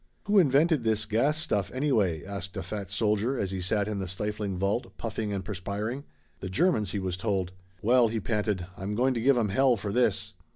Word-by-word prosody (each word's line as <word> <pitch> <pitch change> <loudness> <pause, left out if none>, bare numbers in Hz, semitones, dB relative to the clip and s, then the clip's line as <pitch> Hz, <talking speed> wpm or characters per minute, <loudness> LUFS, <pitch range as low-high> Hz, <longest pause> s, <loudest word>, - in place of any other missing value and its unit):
"Who 205 0 +4
invented 150 -2 +4
this 110 -1 +1
gas 120 +9 +1
stuff, 105 - -1
anyway?" 110 - +1
asked 100 -1 -6
a 95 - -3
fat 100 +1 -5
soldier, 105 +5 +1
as 95 -4 -1
he 95 -1 -3
sat 100 +3 0
in 105 -2 -2
the 95 - -3
stifling 105 +1 -3
vault, 100 +1 -1
puffing 110 -2 -3
and 95 -2 -3
perspiring. 105 +7 -4 0.3
"The 95 - -5
Germans," 110 - +2
he 100 - -3
was 95 -2 -2
told. 95 -2 -1 0.3
"Well," 120 +2 +5
he 115 0 -2
panted, 105 -4 -1
"I'm 100 +2 -4
going 130 +3 +2
to 115 - -2
give 135 +2 +4
'em 110 -3 +1
hell 130 +5 +4
for 100 0 -4
this." 105 -3 +1
105 Hz, 205 wpm, -28 LUFS, 95-120 Hz, 0.3 s, Well